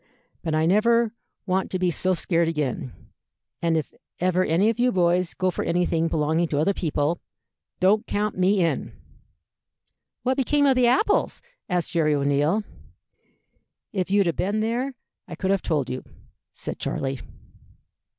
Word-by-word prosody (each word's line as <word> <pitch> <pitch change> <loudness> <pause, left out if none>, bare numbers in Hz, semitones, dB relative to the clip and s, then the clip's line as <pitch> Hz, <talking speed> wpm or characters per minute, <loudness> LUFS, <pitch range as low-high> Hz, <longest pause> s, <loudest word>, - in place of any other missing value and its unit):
But 160 -3 -1
I 155 0 +2
never 230 +5 +3 0.3
want 190 0 0
to 185 - -1
be 180 -1 +1
so 185 +3 0
scared 170 -1 +1
again, 145 -6 -2 0.7
and 165 -1 +2
if 155 - -3 0.3
ever 185 +1 +2
any 175 +5 +2
of 230 - -8
you 250 +1 +3
boys 180 -2 +1
go 185 0 +1
for - - -3
anything 170 -1 +1
belonging 160 +2 +1
to 150 - -2
other 160 +7 +2
people, 160 -2 -1 0.6
don't 195 +4 +4
you - - -21
count 210 0 -1
me 185 +1 +3
in." 165 - -2 1.3
"What 260 +1 +1
became 285 +2 +2
of 270 -2 +4
the 250 -1 +4
apples?" 415 - +2 0.3
asked 180 -2 -1
Jerry 155 -3 +2
O'Neil. 145 +8 +1 1.3
"If 185 -3 -1
you'd 200 0 +3
'a 170 - +1
been 205 +6 -1
there 245 +4 -1 0.3
I 170 - -7
could 190 +3 -1
have 195 -1 +2
told 145 -6 0
you," 130 0 -5 0.5
said - - -6
Charley. 135 -1 -2
180 Hz, 160 wpm, -24 LUFS, 160-210 Hz, 1.3 s, don't